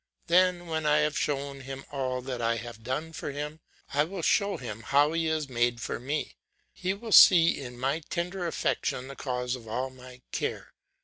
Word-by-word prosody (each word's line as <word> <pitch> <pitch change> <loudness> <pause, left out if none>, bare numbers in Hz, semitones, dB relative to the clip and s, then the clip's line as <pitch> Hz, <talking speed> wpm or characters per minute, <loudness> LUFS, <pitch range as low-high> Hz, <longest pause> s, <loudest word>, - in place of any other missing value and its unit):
Then 180 0 +3
when 160 -2 -2
I 150 0 +4
have 150 -1 +1
shown 140 -1 -2
him 135 0 -8
all 130 -2 -2
that 125 -2 -4
I 115 0 +2
have 115 -1 -7
done 150 +7 -3
for - - -5
him, 150 +2 -5 0.3
I 145 +1 +4
will 175 +2 -5
show 200 +3 +2
him 115 -4 -7
how 145 +6 +3
he 165 -1 0
is 155 -2 0
made 120 -2 +1
for - - -4
me; 145 +5 -3 0.4
he 190 +1 -2
will 225 +2 -8
see 170 -4 +9
in 125 -2 -8
my 135 +5 0
tender 180 +1 -2
affection 130 -5 -1
the 140 - -8
cause 125 -2 -2
of 115 -3 -11
all 130 +4 -2
my 125 -1 -14
care. - - -3
140 Hz, 195 wpm, -28 LUFS, 125-160 Hz, 0.4 s, see